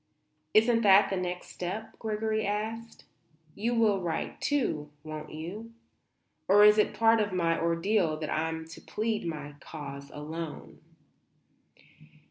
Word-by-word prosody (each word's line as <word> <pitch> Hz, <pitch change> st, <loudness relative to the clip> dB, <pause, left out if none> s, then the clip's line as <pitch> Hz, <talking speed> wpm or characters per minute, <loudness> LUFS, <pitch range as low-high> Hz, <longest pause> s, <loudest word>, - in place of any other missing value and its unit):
"Isn't 230 Hz, +1 st, +5 dB
that 200 Hz, -2 st, +6 dB
the -, -, +1 dB
next 180 Hz, -1 st, -4 dB
step?" 195 Hz, +5 st, -6 dB
Gregory 220 Hz, 0 st, -1 dB
asked. 220 Hz, +3 st, -4 dB, 0.5 s
"You 230 Hz, +6 st, -1 dB
will 215 Hz, -4 st, +3 dB
write, 170 Hz, -2 st, -3 dB
too, 230 Hz, -, 0 dB
won't 155 Hz, -1 st, -7 dB
you? 195 Hz, +9 st, -7 dB, 0.7 s
Or 205 Hz, +2 st, +7 dB
is 210 Hz, +1 st, +7 dB
it 210 Hz, -, +2 dB
part 225 Hz, 0 st, +4 dB
of 205 Hz, -1 st, -1 dB
my 170 Hz, -2 st, +1 dB
ordeal 170 Hz, 0 st, +1 dB
that 155 Hz, -1 st, -4 dB
I'm 160 Hz, +1 st, -2 dB
to -, -, -11 dB
plead 215 Hz, -4 st, -2 dB
my 150 Hz, -3 st, -5 dB
cause 140 Hz, -3 st, -8 dB
alone?" 155 Hz, +1 st, -7 dB
190 Hz, 130 wpm, -29 LUFS, 160-220 Hz, 0.7 s, Or